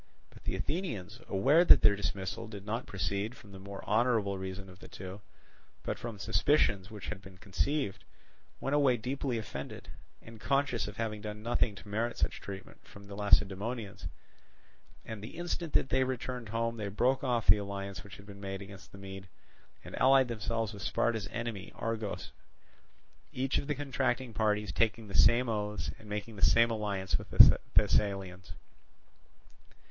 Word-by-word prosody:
But - - -16
the - - -1
Athenians, 120 - -3
aware 135 - +5
that - - +8
their 105 - +7
dismissal 100 +3 -3
did 100 -2 -9
not 115 +4 -3
proceed 100 +4 -2
from 100 - -15
the 95 - -10
more 100 +1 -8
honourable 110 -3 +2
reason 95 +1 -6
of 95 0 -14
the - - -11
two, 95 +2 -8 0.6
but - - -3
from 115 -3 -6
suspicions 105 -2 +2
which 105 -3 -8
had 110 -3 -5
been 95 -2 -13
conceived, 100 - -1 0.6
went 135 - -2
away 140 -4 +4
deeply 130 +1 -2
offended, 70 -11 -6 0.3
and 115 -1 -13
conscious 140 -5 +1
of 105 0 -8
having 110 -2 -2
done 105 0 -6
nothing 115 -2 +1
to 105 - -12
merit 115 +3 -1
such - - -1
treatment 95 -1 -9
from 100 - -14
the 100 0 -10
Lacedaemonians; 105 +2 +1 1.0
and 110 -2 -6
the 110 - -8
instant 175 -2 -3
that 130 - +3
they 130 0 +3
returned 125 -2 -4
home 115 +1 -1
they 105 -2 -3
broke 125 +7 +1
off 120 -4 +1
the - - +7
alliance 100 -1 -5
which 100 - -11
had 100 - -14
been 100 -1 -11
made 95 0 -5
against 100 0 -12
the - - -12
Mede, 95 0 -8 0.6
and - - -7
allied 130 0 +6
themselves 115 0 -2
with 100 - -9
Sparta's 110 +1 0
enemy 115 -5 -5
Argos; 110 -2 -3 1.0
each 135 +1 0
of - - -5
the 150 - 0
contracting 130 -3 -1
parties 105 -1 +1
taking 110 -1 +1
the - - -8
same 120 +4 +5
oaths 105 -2 -2
and 110 - -13
making 105 +1 -4
the - - -8
same 115 0 +6
alliance 100 -4 -1
with - - -10
the - - +9 0.2
Thessalians. 95 -3 +1
105 Hz, 170 wpm, -32 LUFS, 100-120 Hz, 1.0 s, the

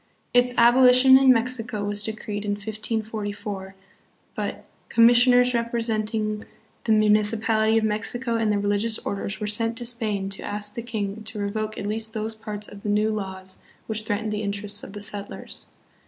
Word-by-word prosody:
Its 245 0 +4
abolition 250 +2 +7
in 265 0 +7
Mexico 230 -3 -1
was 205 0 0
decreed 210 -1 -3
in 205 -1 -1
1544, 210 -2 -4 0.6
but - - -5
" - - -38
commis 230 +1 +6
sioners 250 0 +5
representing 220 -2 -1 0.4
the 225 - +1
municipality 215 +1 +3
of 225 - +1
Mexico 230 +3 -1
and 225 -2 +1
the 205 - +1
religious 205 +2 +1
orders 200 +1 -3
were 210 - -3
sent 225 +2 -1
to 240 - -1
Spain 220 -5 -2
to 195 0 -2
ask 205 0 -2
the 235 - -5
king 220 -3 -4
to 220 0 -8
re 200 -1 -2
voke 215 0 -4
at - - -5
least 220 +1 -3
those 220 0 -3
parts 210 -1 -7
of 205 - -12
the 210 - -4
'New 210 +1 +2
Laws' 190 -3 -6 0.3
which 220 -1 -2
threatened 215 0 -2
the 210 0 -2
interests 205 0 -1
of 195 - -9
the 205 - -7
settlers. 205 0 -3
215 Hz, 175 wpm, -24 LUFS, 205-230 Hz, 0.6 s, abolition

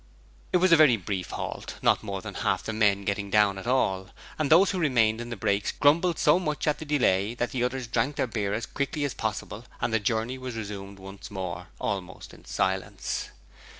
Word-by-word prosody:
It - - +4
was 185 0 +3
a - - +9
very 150 -7 +6
brief 95 -2 -4
halt, - - -5
not - - +4
more - - -5
than - - -6
half - - 0
the 110 - -4
men 100 -2 +2
getting 100 0 -2
down 100 -1 +3
at 105 - -8
all, 95 -7 +1 0.3
and 150 -3 +1
those 180 +5 +6
who 190 - -2
remained 120 -8 +2
in 120 - -6
the 115 - -4
brakes 100 -1 0
grumbled 165 +4 +3
so 150 +4 +4
much 150 -5 -2
at 150 -2 +1
the 155 - -6
delay 115 -7 +2
that 120 0 -2
the 125 -2 -1
others 125 0 -1
drank 135 +5 0
their - - +1
beer 105 -4 -2
as 110 - -3
quickly 145 +2 -3
as 140 - -1
possible - - -4 0.2
and - - -1
the 115 - +3
journey 115 +4 -1
was 130 -2 -6
resumed 100 -2 -6
once 95 +1 -10
more, 90 -2 -5
almost 95 -3 -4
in - - -16
silence. - - -2
115 Hz, 215 wpm, -27 LUFS, 100-145 Hz, 0.3 s, a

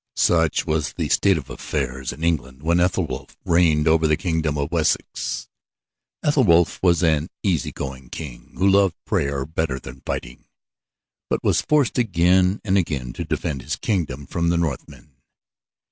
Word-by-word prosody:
Such - - +2
was 75 -2 -1
the - - -3
state - - +3
of - - -7
affairs 65 -3 -3
in 80 - -9
England 70 -5 -1
when 85 +2 +2
Ethelwulf 90 -6 -1
reigned 80 -3 +3
over 80 0 +4
the 75 -1 +2
kingdom 80 -4 -1
of 70 +1 -2
Wessex. 70 -6 -1 0.8
Ethelwulf 100 - +3
was 90 -1 +3
an 80 0 +2
easy 90 -6 0
going 65 -2 -7
king 70 -7 -9
who 95 - +3
loved 100 -2 +4
prayer 70 -1 -1
better 80 -3 -2
than 65 +1 -11
fighting, - - -5 0.8
but - - -1
was - - +2
forced 145 -5 +2
again 95 -2 +3
and 100 -2 +2
again 65 -8 -3
to - - -4
defend 70 -2 -3
his - - -3
kingdom 75 - -2
from 85 +4 -1
the 85 - +2
Northmen. 75 -3 -4
80 Hz, 155 wpm, -22 LUFS, 70-90 Hz, 0.8 s, over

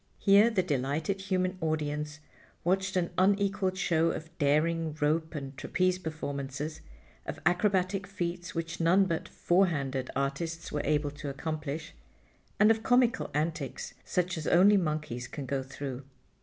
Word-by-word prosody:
Here 205 +3 +6
the 205 -5 +1
delighted 155 +5 -1
human 185 -1 -1
audience 150 -1 -2 0.4
watched 190 +2 +1
an 175 -2 +1
unequaled 195 0 +2
show 165 -3 +2
of 160 +1 -5
daring 155 +2 +2
rope 160 +2 +1
and 135 -2 -5
trapeze 185 +6 0
performances, 150 -2 -4 0.5
of - - -5
acrobatic 190 +2 +2
feats 175 -3 -4
which 165 0 -3
none 180 +4 +5
but 170 -3 -2
"four 185 +3 +3
handed" 135 -5 -2
artists 160 +5 -2
were 145 - -1
able 150 0 +1
to 145 0 -6
accomplish, 155 +1 -4 0.7
and 210 +2 +7
of 220 0 +1
comical 245 0 +3
antics 155 -2 -2
such 180 -2 -1
as 155 - -5
only 195 +4 +6
monkeys 150 -9 -1
can 140 +3 -6
go 135 +1 -1
through. 135 0 -6
165 Hz, 140 wpm, -30 LUFS, 145-185 Hz, 0.7 s, and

